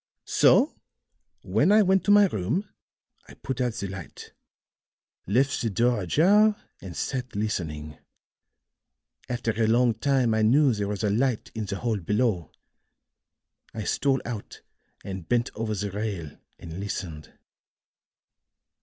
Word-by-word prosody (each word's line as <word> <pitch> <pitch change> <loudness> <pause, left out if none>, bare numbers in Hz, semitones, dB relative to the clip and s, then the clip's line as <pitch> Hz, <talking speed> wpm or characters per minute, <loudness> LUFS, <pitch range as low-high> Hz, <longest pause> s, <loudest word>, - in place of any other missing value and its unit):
So - - +3 0.6
when 110 - +2
I 215 0 +6
went 190 -1 +3
to - - -1
my 205 0 +7
room 140 - -2 0.6
I - - -13
put 130 -1 -4
out 120 -3 -1
the 100 -4 -4
light, 95 -3 -9 1.0
left 130 +8 +1
the 115 - 0
door 120 +2 +1
ajar 200 - +4 0.3
and 90 -3 -8
sat 125 -4 -3
listening. 80 -8 -3 1.3
After 120 -2 -1
a 110 0 0
long 120 +1 +3
time 130 -3 +1
I 110 - +1
knew 130 +5 +4
there 105 -2 -2
was 105 +1 -3
a 105 - +2
light 120 +2 0
in 110 -2 -4
the 100 0 -4
hall 115 +1 -1
below; 105 -3 0 1.2
I 110 - -3
stole 135 +4 0
out 115 -4 -7 0.4
and 95 -4 -7
bent 120 -1 +1
over 110 0 -3
the 100 0 -3
rail 100 -7 -4 0.2
and 85 +1 -8
listened. 90 -6 -6
110 Hz, 135 wpm, -26 LUFS, 100-130 Hz, 1.3 s, my